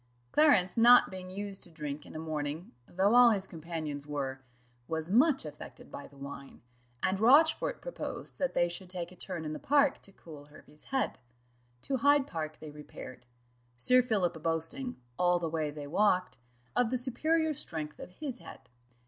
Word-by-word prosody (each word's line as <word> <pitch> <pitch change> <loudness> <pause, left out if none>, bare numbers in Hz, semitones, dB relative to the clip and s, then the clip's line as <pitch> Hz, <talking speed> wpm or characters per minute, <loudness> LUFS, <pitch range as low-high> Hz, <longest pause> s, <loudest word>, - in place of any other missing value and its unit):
Clarence 215 -13 +4
not 240 +2 +7
being 185 -1 -7
used 200 +1 -6
to - - -10
drink 150 -2 -6
in - - -12
a - - -4
morning, 155 +1 -4 0.2
though 195 +4 +2
all 245 0 +8
his 200 -4 +1
companions 160 -4 -6
were, 135 -2 -3 0.5
was 160 +1 -3
much 270 - +4
affected 150 -1 -10
by 140 - -8
the 140 - -19
wine, 140 -2 -9 0.4
and 190 +1 +1
Rochfort 310 - +4
proposed - - -6
that 275 -2 -1
they 175 - +3
should 175 +2 -6
take 180 -2 -5
a - - -13
turn 175 -2 -5
in 155 - -3
the - - -6
park 285 -1 +3
to 195 - -11
cool 155 -6 -12
Hervey's 150 0 -17
head. 270 -1 -1 0.6
To 270 - -1
Hyde 285 +2 +4
park 155 - -5
they 155 -1 -9
repaired; 130 -4 -11 0.5
Sir 250 - +5
Philip 185 -9 -1
boasting, 165 - -1 0.2
all 180 0 +4
the 170 -1 -2
way 155 -1 -1
they 145 0 -7
walked, 180 +2 +1 0.4
of 245 -2 +3
the 255 - 0
superior 315 +6 0
strength 160 - -4
of - - -8
his 255 +5 -6
head. - - -13
180 Hz, 175 wpm, -31 LUFS, 155-245 Hz, 0.6 s, all